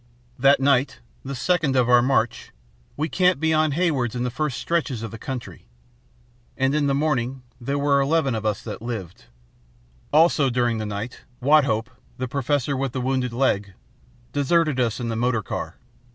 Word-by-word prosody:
"That 140 +2 +5
night, 135 -1 +2 0.2
the 135 +1 -5
second 155 0 +1
of 125 -2 +3
our 125 -1 +6
march, 120 -3 0 0.5
we 155 +2 0
camped 180 +1 +2
beyond 155 -2 +2
Haywards 145 -9 0
in 120 - -1
the 125 - -2
first 150 -1 -2
stretches 145 -9 -1
of 115 - -5
country. 125 - -7 0.9
And 135 +1 +1
in 150 -1 +1
the 140 - +1
morning 135 -3 -1 0.2
there 140 +4 -2
were 140 -1 +3
eleven 140 -1 +1
of 110 -1 -3
us 105 -2 -1
that 105 -2 -7
lived. 110 -7 -6 0.9
Also, 155 -2 +4
during 120 -2 0
the 110 - -3
night, 105 +4 -5 0.2
Wathope, 130 -4 +3 0.3
the 130 - -3
professor 140 +1 -1
with 135 -2 -2
the 130 - -2
wounded 130 -1 -1
leg, 105 -6 0 0.6
deserted 150 0 +2
us 120 -2 0
in 120 -1 -3
the 115 - -2
motor 115 -1 0
car. - - -5
130 Hz, 165 wpm, -23 LUFS, 120-145 Hz, 0.9 s, our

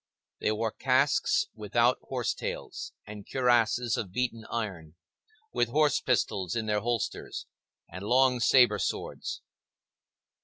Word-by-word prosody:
They - - +1
wore 110 +1 -1
casques 145 - +2
without - - +1
horse - - -2
tails, - - -5
and 105 -1 -9
cuirasses 120 -2 +2
of 95 -5 -4
beaten 115 0 -2
iron, 90 -9 -4 0.6
with 120 - +1
horse 145 +2 +3
pistols 100 - 0
in 115 -1 -1
their 105 -1 +1
holsters, 115 +1 -3 0.4
and 95 +3 -8
long 125 +3 +3
sabre 120 -3 +5
swords. - - -3
120 Hz, 120 wpm, -29 LUFS, 105-130 Hz, 0.6 s, sabre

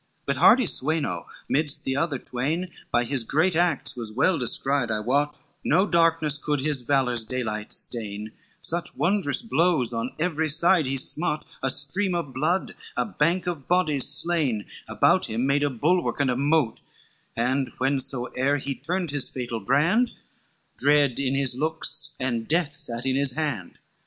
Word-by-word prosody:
XIX - - -39
"But - - -1
hardy 255 -1 +6
Sweno 135 - 0 0.2
midst 150 +1 +1
the 130 - -2
other 145 0 -1
train, 150 +10 -3 0.2
By 120 - +2
his 130 0 -2
great 160 +9 +1
acts 165 -5 +1
was 115 -3 -4
well 140 +10 +1
descried 135 +1 0
I 110 -1 -1
wot, 145 +7 0 0.3
No 185 +6 +2
darkness 165 -4 +2
could 150 -1 -1
his 140 -1 0
valor's 125 -3 0
daylight 110 -3 -4
stain, 110 -2 0 0.3
Such 170 0 0
wondrous 190 -1 +1
blows 165 - +1
on 115 +2 -4
every 160 -1 -1
side 165 0 +3
he 135 +1 -2
smote; 150 +3 +1 0.2
A 135 - 0
stream 160 +8 +2
of 165 -6 -4
blood, 160 +8 -1 0.2
a - - +1
bank 175 -2 0
of 165 -7 -5
bodies 155 -7 +2
slain, 145 -12 +1 0.2
About - - +2
him 115 +4 -2
made 140 +1 +1
a 145 - +1
bulwark, 160 +8 0
and 140 -3 +2
a - - -1
mote, 140 -2 +1 0.5
And 130 +3 -1
when 135 +2 0
soe'er 130 +2 -1
he 140 0 -4
turned 175 +3 -3
his 145 -2 -1
fatal 120 -3 -5
brand, 165 - +2 0.7
Dread 145 -3 +3
in 135 -1 -1
his 135 -3 0
looks 155 +1 +1
and 120 -3 -2
death 160 -2 0
sate 120 -5 0
in 130 0 0
his 140 -2 0
hand. 145 - -4
140 Hz, 165 wpm, -24 LUFS, 125-160 Hz, 0.7 s, hardy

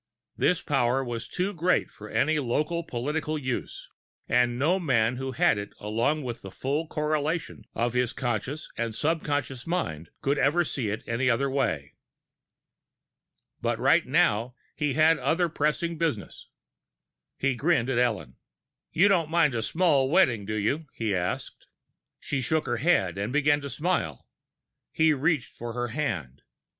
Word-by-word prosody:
This - - +1
power 125 +3 +1
was 120 -2 -4
too 190 +3 -2
great 180 +1 +1
for 105 0 -11
any 155 +1 +2
local 150 +6 -1
political 150 +4 -2
use, 130 -4 -4 0.4
and 120 0 +2
no 165 +9 +2
man 125 -7 +2
who 135 0 -4
had 110 -2 +3
it 100 - -7
along 115 +9 0
with 120 -2 -5
the 95 - -8
full 145 - -2
correlation 155 +1 -2
of 120 +1 0
his 125 -1 +1
conscious 130 +4 -3
and 115 -2 -2
subconscious 145 -4 -1
mind 80 - -2
could 140 +1 +1
ever 145 +6 +3
see 130 -9 -2
it 105 - -3
any 125 +2 +1
other 135 +3 +1
way. 80 - -1 1.7
But - - 0
right - - +4
now, 115 +4 +2 0.2
he 150 -3 0
had 160 +1 +5
other 165 +7 +2
pressing 155 +2 -1
business. 155 - -3 0.9
He 135 -1 +1
grinned 140 -2 +2
at 120 - +1
Ellen. 110 -9 -1 0.5
"You 185 +5 +5
don't 175 -6 +2
mind 165 -4 +3
a 115 - -1
small 145 -1 +2
wedding, 130 - +3
do 110 - -2
you?" 140 +10 -1
he 110 -3 -1
asked. 90 -1 -3 0.5
She 135 - -2
shook 155 +6 0
her - - -1
head, 100 - +1
beginning 145 +1 +3
to 140 - -5
smile. 140 - -2 0.6
He 160 -1 +3
reached 145 -1 0
for 120 0 -6
her 120 0 -2
hand. 95 - -3
135 Hz, 150 wpm, -27 LUFS, 115-155 Hz, 1.7 s, had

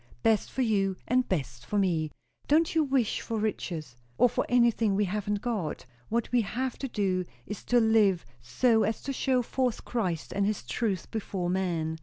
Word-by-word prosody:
Best 220 -2 +2
for 265 - 0
you 195 -4 +1
and 250 +1 +2
best 135 -9 -2
for 205 - -2
me. 170 -6 +1 0.4
Don't 315 +3 +3
you 320 -1 +3
wish 265 -6 +1
for 230 - -3
riches! 170 - -3 0.2
or 245 - +5
for - - -1
anything 235 -4 +3
we 205 +1 +2
haven't 205 +1 -2
got. 210 - -3 0.2
What 235 +1 -1
we 245 -1 +4
have 245 +5 -3
to 270 - -2
do, 195 -6 0 0.2
is 210 - -6
to 245 - +4
live 220 -5 +3 0.2
so 220 - +2
as 220 - -1
to 275 - -3
show 255 -1 +1
forth 250 -1 -1
Christ 185 -10 -2
and 200 0 +1
his 210 -8 -2
truth 190 - -2
before 190 -5 -2
men." 165 -4 -1
210 Hz, 185 wpm, -28 LUFS, 185-240 Hz, 0.4 s, or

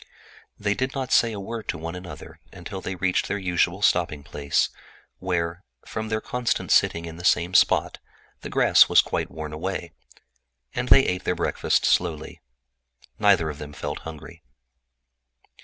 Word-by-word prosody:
They 100 0 0
did 130 +5 -3
not 130 -2 -3
say 115 - +4
a 105 - -5
word 110 +3 -6
to - - -2
one 80 +1 -6
another 90 0 -10
until 95 - -8
they 95 - -4
reached 90 0 0
their 100 - -1
usual 90 -3 0
halting 75 -2 +2
place, 70 0 0 0.5
where, 90 0 -2 0.2
from 110 -1 -5
their 110 0 0
constant 125 -2 -2
sitting 85 0 +3
in 80 0 -8
the 90 - -9
same 85 0 +2
spot - - +3 0.4
the - - -8
grass - - +5
was - - +6
quite - - -3
worn 75 -1 -7
away. 85 +1 -4 0.8
They 125 +2 +5
ate 90 +1 -1
their 90 - 0
breakfast - - 0
slowly. 80 -3 0 0.8
Neither 95 -7 +3
of 75 - -11
them 75 -1 -8
felt 75 0 -5
hungry. 80 +1 -10
90 Hz, 155 wpm, -24 LUFS, 80-100 Hz, 0.8 s, was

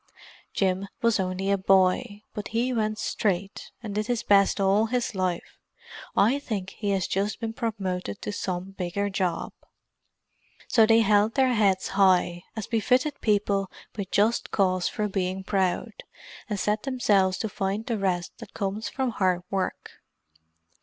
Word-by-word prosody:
Jim 190 0 0 0.2
was 230 -2 +3
only 190 +1 -1
a 200 - +3
boy, 195 +3 +2
but 210 - -5
he 240 +3 0
went 215 -2 0
straight 200 -3 -2
and 210 -3 -5
did 210 +1 -1
his 240 -2 -1
best 200 0 +4
all 200 +3 +3
his 245 0 -1
life. 185 -3 -3 0.6
I 230 +8 +4
think 205 -9 -4
he 205 - -4
has 195 -2 +1
just 200 +3 -1
been 225 -1 -3
promoted 190 - -3
to - - -3
some 185 -2 -4
bigger 195 +2 -2
job." 180 -3 -1 1.1
So 225 -2 +5
they 225 0 +6
held 210 +1 +3
their 260 -2 +3
heads 200 -4 +2
high, 185 -3 +3
as 220 -3 -4
befitted 255 +6 +1
people 200 -2 +1 0.3
with 200 -3 -4
just 215 +3 +2
cause 185 -3 +1
for 210 - -2
being 190 -1 -2
proud, 190 -2 0 0.6
and 205 -2 -2
set 210 +2 0
themselves 205 -8 +2
to 220 - -2
find 200 +2 -2
the 230 -4 -2
rest 180 -3 -1
that - - -11
comes 205 +1 -2
from 265 -2 -1
hard 185 -4 +1
work. 195 -1 -2
200 Hz, 155 wpm, -26 LUFS, 190-220 Hz, 1.1 s, they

